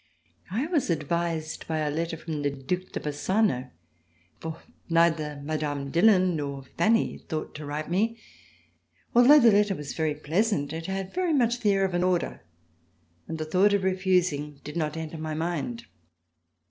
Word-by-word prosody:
I 225 Hz, +9 st, -1 dB
was 315 Hz, -, 0 dB
advised 165 Hz, 0 st, -2 dB
by 160 Hz, -, -1 dB
a 150 Hz, -1 st, 0 dB
letter 165 Hz, +2 st, -2 dB
from 155 Hz, -2 st, -5 dB
the 145 Hz, -, +1 dB
Due 140 Hz, +7 st, -3 dB
de -, -, -6 dB
Bassano, 150 Hz, -, 0 dB, 0.7 s
for 160 Hz, -1 st, -6 dB, 0.3 s
neither 160 Hz, -3 st, +2 dB
Mme. 145 Hz, -2 st, -3 dB
Dillon 185 Hz, -1 st, +4 dB
nor 140 Hz, -2 st, -4 dB
Fanny 225 Hz, -, +1 dB
thought 155 Hz, -4 st, -5 dB
to 150 Hz, -1 st, -7 dB
write 150 Hz, +1 st, -3 dB
me. 220 Hz, +6 st, 0 dB, 1.0 s
Although 250 Hz, +5 st, +8 dB
the 235 Hz, -4 st, +6 dB
letter 205 Hz, -1 st, +3 dB
was 150 Hz, -4 st, -6 dB
very 155 Hz, -2 st, 0 dB
pleasant, 155 Hz, 0 st, 0 dB
it 165 Hz, +1 st, -5 dB
had 190 Hz, 0 st, -4 dB
very 360 Hz, -3 st, +1 dB
much 240 Hz, -3 st, +2 dB
the 210 Hz, -3 st, +3 dB
air 195 Hz, 0 st, +2 dB
of 190 Hz, -, -2 dB
an 175 Hz, 0 st, +1 dB
order, 180 Hz, -, 0 dB, 0.8 s
and 165 Hz, -, -4 dB
the 155 Hz, -, -3 dB
thought 190 Hz, +6 st, +3 dB
of 200 Hz, -1 st, +1 dB
refusing 180 Hz, -6 st, +1 dB
did 150 Hz, -, -8 dB
not 155 Hz, -2 st, -1 dB
enter 160 Hz, 0 st, -5 dB
my 155 Hz, 0 st, -3 dB
mind. 175 Hz, +9 st, -3 dB
165 Hz, 165 wpm, -27 LUFS, 150-195 Hz, 1.0 s, Although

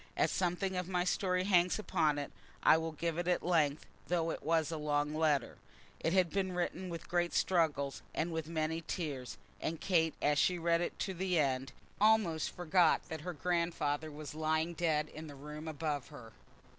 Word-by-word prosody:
As -, -, +3 dB
something 185 Hz, +1 st, 0 dB
of 180 Hz, -1 st, -2 dB
my 180 Hz, -1 st, +1 dB
story 180 Hz, 0 st, +1 dB
hangs 180 Hz, -2 st, +3 dB
upon 155 Hz, -8 st, +1 dB
it, 145 Hz, -, -4 dB, 0.3 s
I -, -, +7 dB
will 160 Hz, 0 st, -1 dB
give 165 Hz, +1 st, -2 dB
it 175 Hz, -, -2 dB
at 180 Hz, -, +1 dB
length, 155 Hz, -4 st, +2 dB, 0.2 s
though 165 Hz, -2 st, +1 dB
it -, -, -5 dB
was 160 Hz, 0 st, +1 dB
a 160 Hz, -, -2 dB
long 150 Hz, 0 st, 0 dB
letter. 155 Hz, -5 st, +1 dB, 0.4 s
It 165 Hz, -, 0 dB
had 185 Hz, -2 st, +3 dB
been 190 Hz, -2 st, -1 dB
written 180 Hz, +1 st, -2 dB
with 170 Hz, -1 st, -6 dB
great 175 Hz, -1 st, 0 dB
struggles, 150 Hz, -6 st, +1 dB
and 170 Hz, +2 st, -1 dB
with 160 Hz, -1 st, -3 dB
many 160 Hz, 0 st, -1 dB
tears, 140 Hz, -7 st, -4 dB, 0.2 s
and 160 Hz, 0 st, -2 dB
Kate, 165 Hz, -5 st, +2 dB
as 145 Hz, 0 st, +2 dB
she 180 Hz, -, +3 dB
read 170 Hz, 0 st, +2 dB
it 175 Hz, -, -3 dB
to 190 Hz, -, -1 dB
the 185 Hz, 0 st, 0 dB
end, 135 Hz, -3 st, +1 dB, 0.3 s
almost 210 Hz, -7 st, +3 dB
forgot 175 Hz, 0 st, +2 dB
that 160 Hz, -2 st, -5 dB
her 180 Hz, +2 st, -4 dB
grandfather 165 Hz, -3 st, -1 dB
was 150 Hz, 0 st, -8 dB
lying 160 Hz, +2 st, 0 dB
dead 155 Hz, -3 st, +1 dB
in 155 Hz, +1 st, -8 dB
the 145 Hz, -, -9 dB
room 150 Hz, +3 st, -8 dB
above 150 Hz, -3 st, -2 dB
her. 115 Hz, -2 st, -12 dB
165 Hz, 190 wpm, -34 LUFS, 150-175 Hz, 0.4 s, I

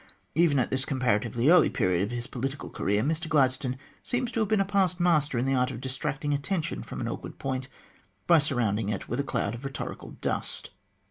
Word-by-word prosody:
Even 160 Hz, -2 st, +4 dB
at 125 Hz, -, +1 dB
this 130 Hz, 0 st, +1 dB
comparatively 120 Hz, 0 st, +1 dB
early 180 Hz, -2 st, +7 dB
period 90 Hz, -1 st, +1 dB
of -, -, -6 dB
his 120 Hz, 0 st, -4 dB
political 135 Hz, +2 st, -4 dB
career, 105 Hz, +2 st, 0 dB
Mr 160 Hz, +3 st, -1 dB
Gladstone 130 Hz, -3 st, +2 dB, 0.2 s
seems 245 Hz, 0 st, -2 dB
to 230 Hz, -, -2 dB
have 215 Hz, -3 st, +1 dB
been 215 Hz, -, +3 dB
a 195 Hz, -, +3 dB
past 190 Hz, -3 st, +1 dB
master 155 Hz, -7 st, +2 dB
in 120 Hz, -, +1 dB
the 135 Hz, -, +1 dB
art 125 Hz, -1 st, +2 dB
of 125 Hz, -3 st, -6 dB
distracting 135 Hz, +3 st, -2 dB
attention 155 Hz, +4 st, -2 dB
from -, -, -6 dB
an -, -, -2 dB
awkward -, -, -6 dB
point 130 Hz, -1 st, -3 dB, 0.6 s
by 170 Hz, -2 st, +6 dB
surrounding 115 Hz, -8 st, 0 dB
it 100 Hz, -3 st, -3 dB
with 120 Hz, -, -2 dB
a -, -, +2 dB
cloud 120 Hz, -6 st, -1 dB
of 120 Hz, +3 st, -8 dB
rhetorical 135 Hz, 0 st, -5 dB
dust. -, -, -3 dB
135 Hz, 205 wpm, -28 LUFS, 120-160 Hz, 0.6 s, early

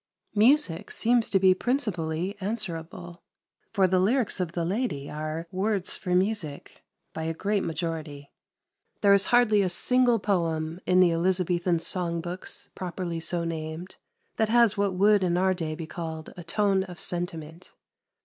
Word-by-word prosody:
Music 220 Hz, -, +3 dB
seems 235 Hz, 0 st, +2 dB
to 195 Hz, -, +3 dB
be 190 Hz, 0 st, +6 dB
principally 185 Hz, -, -1 dB
answerable. 180 Hz, -3 st, -4 dB, 0.5 s
For 195 Hz, -4 st, +3 dB
the 185 Hz, 0 st, +2 dB
lyrics 220 Hz, +3 st, +1 dB
of 175 Hz, -2 st, -2 dB
the 170 Hz, -1 st, -1 dB
lady 185 Hz, -, -2 dB
are 155 Hz, +2 st, -4 dB
"words 195 Hz, 0 st, -1 dB
for 180 Hz, -3 st, -2 dB
music" 185 Hz, -6 st, -2 dB, 0.3 s
by 160 Hz, -, -4 dB
a 165 Hz, 0 st, -2 dB
great 205 Hz, +2 st, 0 dB
majority. 155 Hz, -3 st, -5 dB, 0.7 s
There 200 Hz, -1 st, +6 dB
is 200 Hz, -1 st, +4 dB
hardly 240 Hz, -4 st, +4 dB
a 190 Hz, -, +1 dB
single 250 Hz, +6 st, +3 dB
poem 165 Hz, -5 st, -1 dB
in 185 Hz, 0 st, +5 dB
the 175 Hz, -2 st, +4 dB
Elizabethan 175 Hz, 0 st, +1 dB
Song 170 Hz, 0 st, -2 dB
books, 175 Hz, +2 st, -5 dB
properly 175 Hz, -2 st, -4 dB
so 170 Hz, +1 st, -1 dB
named, 160 Hz, +2 st, -5 dB, 0.4 s
that 220 Hz, -1 st, +1 dB
has 235 Hz, -2 st, +4 dB
what 200 Hz, -2 st, 0 dB
would 205 Hz, +1 st, +4 dB
in 175 Hz, -1 st, +1 dB
our 190 Hz, +1 st, +3 dB
day 160 Hz, -4 st, -4 dB
be 165 Hz, 0 st, -6 dB
called 160 Hz, -1 st, -7 dB
a 175 Hz, -, -9 dB
tone 195 Hz, +2 st, +1 dB
of 180 Hz, -2 st, -10 dB
sentiment. 170 Hz, -1 st, -4 dB
180 Hz, 155 wpm, -27 LUFS, 165-200 Hz, 0.7 s, be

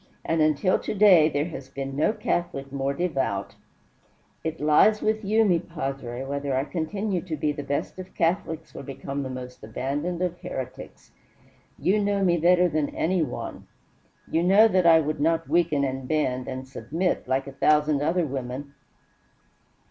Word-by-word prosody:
"And 165 Hz, -1 st, +1 dB
until 155 Hz, +4 st, +2 dB
to -, -, -4 dB
day 185 Hz, -6 st, +6 dB
there 145 Hz, 0 st, -1 dB
has 140 Hz, -6 st, -8 dB
been 135 Hz, 0 st, -5 dB
no 150 Hz, +8 st, +2 dB
Catholic 140 Hz, -10 st, -2 dB
more 135 Hz, 0 st, -1 dB
devout 135 Hz, -, -1 dB, 0.5 s
" -, -, -38 dB
"It 160 Hz, 0 st, -3 dB
lies 155 Hz, +8 st, +4 dB
with 215 Hz, +1 st, 0 dB
you, 220 Hz, +3 st, +3 dB
mi 180 Hz, -4 st, +3 dB
padre, 135 Hz, -6 st, -5 dB
whether 140 Hz, -1 st, -2 dB
I 135 Hz, -, +1 dB
continue 185 Hz, +4 st, -2 dB
to 165 Hz, -3 st, -4 dB
be 150 Hz, +1 st, 0 dB
the 145 Hz, -, -5 dB
best 140 Hz, +6 st, -3 dB
of 185 Hz, 0 st, -9 dB
Catholics 165 Hz, -1 st, -1 dB
or -, -, -6 dB
become 135 Hz, +1 st, -5 dB
the 130 Hz, -, -4 dB
most 125 Hz, -2 st, -8 dB
abandoned 145 Hz, +10 st, -3 dB
of 175 Hz, -1 st, -2 dB
heretics. 170 Hz, -8 st, -7 dB, 0.7 s
You 205 Hz, +3 st, +2 dB
know 200 Hz, -1 st, +1 dB
me 175 Hz, -2 st, +3 dB
better 180 Hz, +2 st, +4 dB
than 155 Hz, -3 st, -1 dB
anyone. 165 Hz, -5 st, -2 dB, 0.6 s
You 165 Hz, -, +1 dB
know 195 Hz, +5 st, +6 dB
that 185 Hz, -5 st, +2 dB
I 165 Hz, -1 st, +8 dB
will 150 Hz, -1 st, -3 dB
not 165 Hz, +1 st, +1 dB
weaken 155 Hz, -4 st, +2 dB
and 135 Hz, -1 st, -3 dB
bend 130 Hz, -4 st, 0 dB
and 130 Hz, 0 st, -5 dB
submit, 145 Hz, +8 st, -2 dB
like 135 Hz, +1 st, 0 dB
a 140 Hz, -, -8 dB
thousand 150 Hz, +1 st, +2 dB
other 165 Hz, +3 st, +1 dB
women. 135 Hz, 0 st, -5 dB
155 Hz, 170 wpm, -25 LUFS, 135-175 Hz, 0.7 s, I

